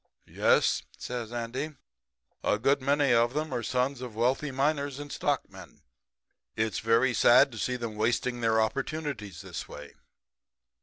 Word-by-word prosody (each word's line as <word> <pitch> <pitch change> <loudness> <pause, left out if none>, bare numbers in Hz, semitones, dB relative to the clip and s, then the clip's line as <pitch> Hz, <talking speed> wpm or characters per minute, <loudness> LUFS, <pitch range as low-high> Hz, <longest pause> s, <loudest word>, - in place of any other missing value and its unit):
"'Yes,' - - +2 0.2
says 120 -2 -5
Andy, 125 +6 -4 0.7
'a - - +2
good 135 +5 +2
many 140 0 +3
of 120 +2 +3
them 155 -2 -2
are 120 - -1
sons 125 +2 -1
of 125 -4 -7
wealthy 130 +6 +1
miners 140 0 0
and 145 0 -7
stockmen. - - -4 0.7
It's 110 0 -1
very 115 +3 +3
sad 125 +4 +6
to 110 - -8
see 125 +4 -1
'em 115 -3 -5
wasting 120 +2 0
their 110 -1 +3
opportunities 115 - -3
this - - -6
way.' - - -10
125 Hz, 145 wpm, -28 LUFS, 115-140 Hz, 0.7 s, sad